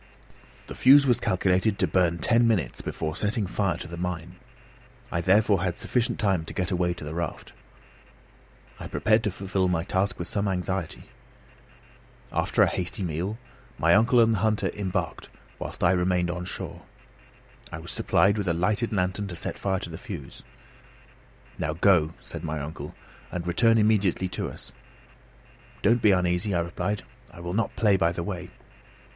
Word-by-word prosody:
The -, -, -8 dB
fuse 140 Hz, +2 st, +7 dB
was 125 Hz, -3 st, +3 dB
calculated 95 Hz, +2 st, +1 dB
to -, -, +2 dB
burn 85 Hz, -2 st, +2 dB
ten 115 Hz, +6 st, +3 dB
minutes 90 Hz, -, 0 dB
before 80 Hz, 0 st, -4 dB
setting 105 Hz, +2 st, -1 dB
fire 95 Hz, -2 st, -1 dB
to 90 Hz, -, -7 dB
the 85 Hz, 0 st, -8 dB
mine. 90 Hz, 0 st, -4 dB, 0.7 s
I 85 Hz, -, 0 dB
therefore 100 Hz, +1 st, +3 dB
had 90 Hz, -2 st, -1 dB
sufficient 125 Hz, -2 st, -1 dB
time 95 Hz, -6 st, +1 dB
to -, -, -8 dB
get 90 Hz, +1 st, -1 dB
away 90 Hz, -1 st, +1 dB
to -, -, -9 dB
the 75 Hz, +1 st, -5 dB
raft. 85 Hz, -2 st, -5 dB, 1.3 s
I -, -, -6 dB
prepared 110 Hz, +1 st, +2 dB
to -, -, +2 dB
fulfil 95 Hz, 0 st, -1 dB
my 85 Hz, -2 st, 0 dB
task 95 Hz, +1 st, 0 dB
with 85 Hz, -, -5 dB
some 100 Hz, 0 st, -1 dB
anxiety. 95 Hz, -2 st, -2 dB, 1.3 s
After -, -, +2 dB
a -, -, +4 dB
hasty 90 Hz, +2 st, -2 dB
meal, 90 Hz, +6 st, -3 dB, 0.4 s
my 85 Hz, +1 st, +4 dB
uncle 115 Hz, +5 st, +5 dB
and 115 Hz, -1 st, +5 dB
the 105 Hz, -, 0 dB
hunter 110 Hz, +1 st, +1 dB
embarked 100 Hz, -3 st, -3 dB, 0.3 s
whilst -, -, -6 dB
I 85 Hz, -, +5 dB
remained 90 Hz, -1 st, +1 dB
on 90 Hz, 0 st, -5 dB
shore. -, -, -6 dB, 0.9 s
I -, -, -5 dB
was 80 Hz, +1 st, -8 dB
supplied 100 Hz, +2 st, +2 dB
with 100 Hz, -, -2 dB
a 85 Hz, -, +2 dB
lighted 105 Hz, +7 st, 0 dB
lantern 95 Hz, 0 st, -1 dB
to 90 Hz, -, -6 dB
set -, -, -4 dB
fire 95 Hz, -1 st, 0 dB
to 85 Hz, -, -6 dB
the 80 Hz, -, -7 dB
fuse. 90 Hz, -, -8 dB, 1.2 s
"Now 75 Hz, -, -1 dB
go," 85 Hz, -2 st, +3 dB
said 85 Hz, -1 st, -7 dB
my 80 Hz, -1 st, -3 dB
uncle, 75 Hz, +3 st, -7 dB, 0.4 s
"and 85 Hz, -1 st, -4 dB
return 115 Hz, +6 st, +4 dB
immediately 105 Hz, -4 st, +2 dB
to -, -, -3 dB
us." -, -, -10 dB, 1.1 s
"Don't 115 Hz, +3 st, +4 dB
be 105 Hz, -, +5 dB
uneasy," 90 Hz, +1 st, +2 dB
I 85 Hz, -, +2 dB
replied. 90 Hz, +4 st, -3 dB, 0.3 s
"I -, -, -14 dB
will 85 Hz, +1 st, -5 dB
not 115 Hz, +3 st, -1 dB
play 105 Hz, -3 st, +3 dB
by 85 Hz, -2 st, +2 dB
the 85 Hz, 0 st, -4 dB
way." 90 Hz, -1 st, -5 dB
95 Hz, 175 wpm, -26 LUFS, 85-105 Hz, 1.3 s, fuse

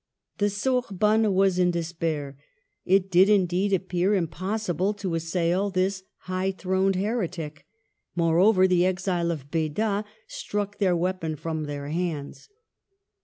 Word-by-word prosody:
The 205 Hz, 0 st, +2 dB
Sorbonne 215 Hz, -1 st, +1 dB
w^as 195 Hz, -2 st, +2 dB
in 180 Hz, -1 st, +4 dB
despair. 165 Hz, -4 st, -3 dB, 0.5 s
It 195 Hz, 0 st, +2 dB
did, 185 Hz, +3 st, +6 dB
indeed, 190 Hz, -1 st, +2 dB
appear 185 Hz, +1 st, +1 dB
impossible 190 Hz, +2 st, -1 dB
to 195 Hz, -4 st, -4 dB
assail 170 Hz, +4 st, 0 dB
this 190 Hz, 0 st, 0 dB, 0.2 s
high 185 Hz, +1 st, -2 dB
throned 190 Hz, +1 st, 0 dB
heretic; 180 Hz, -7 st, -3 dB, 0.5 s
moreover, 185 Hz, +4 st, +4 dB
the 180 Hz, -1 st, +3 dB
exile 185 Hz, -2 st, 0 dB
of 145 Hz, -4 st, -5 dB
Beda 200 Hz, +6 st, 0 dB, 0.2 s
struck 205 Hz, 0 st, -4 dB
their 185 Hz, -4 st, +3 dB
weapon 175 Hz, -2 st, -2 dB
from 160 Hz, 0 st, -4 dB
their 145 Hz, -1 st, -5 dB
hands. 160 Hz, -, -4 dB
185 Hz, 120 wpm, -26 LUFS, 165-195 Hz, 0.5 s, did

